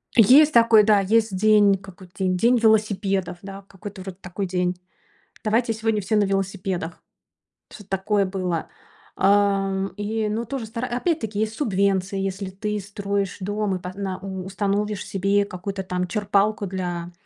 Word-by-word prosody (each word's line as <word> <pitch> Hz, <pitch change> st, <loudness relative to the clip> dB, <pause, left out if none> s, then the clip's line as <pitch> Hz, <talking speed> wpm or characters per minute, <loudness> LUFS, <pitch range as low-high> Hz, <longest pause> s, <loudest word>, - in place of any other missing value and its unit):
Есть 270 Hz, +7 st, +7 dB
такой, 230 Hz, -2 st, +6 dB
да, 210 Hz, -1 st, +5 dB
есть 215 Hz, 0 st, +2 dB
день, 210 Hz, 0 st, +5 dB
какой 190 Hz, -1 st, -14 dB
день? 185 Hz, -1 st, +1 dB
День 240 Hz, +6 st, +3 dB
велосипедов. 200 Hz, -5 st, +1 dB
Да, 195 Hz, 0 st, -9 dB
какой-то 195 Hz, 0 st, -10 dB
вроде 185 Hz, -1 st, -8 dB
такой 190 Hz, +1 st, -4 dB
день. 180 Hz, 0 st, 0 dB, 0.7 s
Давайте 225 Hz, +1 st, +1 dB
сегодня 220 Hz, -1 st, -1 dB
все 205 Hz, +3 st, -1 dB
на 210 Hz, -, +4 dB
велосипедах. 195 Hz, -3 st, -2 dB, 0.7 s
Что-то 205 Hz, -3 st, -13 dB
такое 195 Hz, +1 st, +1 dB
было. 185 Hz, -3 st, -2 dB, 0.5 s
Ам, 195 Hz, -1 st, +2 dB
и, 215 Hz, +1 st, -2 dB
ну, 225 Hz, +3 st, -2 dB
тоже 260 Hz, -1 st, -4 dB
стара 230 Hz, +3 st, -4 dB
опять-таки 245 Hz, -, -2 dB
есть 220 Hz, 0 st, -1 dB
субвенция. 195 Hz, -5 st, 0 dB
Если 195 Hz, 0 st, -3 dB
ты 210 Hz, +2 st, -3 dB
строишь 200 Hz, 0 st, -3 dB
дом 205 Hz, 0 st, -1 dB
и -, -, -4 dB
по 180 Hz, 0 st, -6 dB
на 190 Hz, -2 st, -4 dB
у 190 Hz, -1 st, -6 dB
установишь 200 Hz, +1 st, -2 dB
себе 200 Hz, +1 st, +1 dB
какую-то 190 Hz, +1 st, -5 dB
там 180 Hz, -1 st, -2 dB
черпалку 205 Hz, +1 st, +1 dB
для 175 Hz, -2 st, -4 dB
200 Hz, 155 wpm, -23 LUFS, 190-215 Hz, 0.7 s, Есть